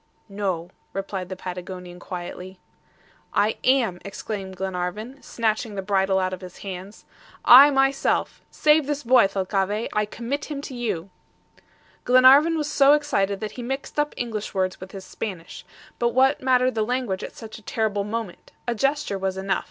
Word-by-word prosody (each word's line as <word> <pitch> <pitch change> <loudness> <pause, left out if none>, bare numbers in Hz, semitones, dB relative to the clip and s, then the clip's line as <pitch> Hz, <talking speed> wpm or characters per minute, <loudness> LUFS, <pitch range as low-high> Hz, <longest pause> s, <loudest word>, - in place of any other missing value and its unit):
"No," 190 -4 -3 0.2
replied 195 -2 -4
the 185 - -4
Patagonian 180 -1 -7
quietly. 180 +1 -7 0.8
"I 210 +2 +2
am," 245 -9 +2
exclaimed 195 -1 -6
Glenarvan, 190 +8 -4
snatching 220 -1 -2
the 195 - -3
bridle 190 -1 +2
out 185 0 0
of 185 - -6
his 180 -1 -10
hands. 190 +2 -8 0.4
"I, 270 +4 +10
myself! 270 0 +1
Save 300 -1 +3
this 295 0 -2
boy, 245 -4 +5
Thalcave! 195 +2 -1
I 210 0 +1
commit 240 +7 -4
him 295 -2 -5
to 280 - -8
you." 205 -7 -3 0.9
Glenarvan 265 +6 +6
was 300 -2 -1
so 285 -1 +5
excited 200 -10 0
that 215 - -4
he 250 - -8
mixed 270 +4 -4
up 295 0 0
English 220 -4 -4
words 185 -1 -1
with 185 - -9
his 190 -1 -9
Spanish. 185 -5 -7 0.4
But 235 0 0
what 265 +2 +4
mattered 255 0 +3
the 220 - -1
language 235 -4 -1
at - - -7
such 220 0 -9
a - - -18
terrible 210 -2 -1
moment. 215 -2 -6
A 240 - +1
gesture 275 -4 0
was 190 0 -2
enough. 190 0 0
210 Hz, 165 wpm, -24 LUFS, 190-255 Hz, 0.9 s, I